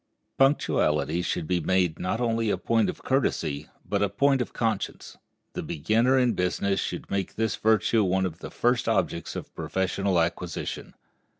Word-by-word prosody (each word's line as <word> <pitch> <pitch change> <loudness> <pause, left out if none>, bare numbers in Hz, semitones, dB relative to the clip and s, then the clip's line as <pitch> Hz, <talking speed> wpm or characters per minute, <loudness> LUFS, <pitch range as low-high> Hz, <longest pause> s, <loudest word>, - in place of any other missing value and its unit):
Punctuality 85 - +2
should 85 - -2
be 90 +2 +1
made 90 -1 +1
not 90 +5 -1
only 115 -2 0
a - - +1
point 115 -2 +1
of - - -7
courtesy 80 - 0 0.2
but - - -1
a 100 - +2
point 135 +6 +2
of 125 - -3
conscience. 110 -4 -3 0.4
The - - -3
beginner 115 - +2
in 125 -2 +3
business 95 +2 0
should - - -4
make 100 -2 -2
this 110 -1 0
virtue 110 0 +3
one 95 0 +1
of 85 -2 -5
the - - -7
first 120 -1 +1
objects 85 -6 -1
of - - -7
professional 95 0 0
acquisition. 85 +1 -3
100 Hz, 165 wpm, -26 LUFS, 90-115 Hz, 0.4 s, in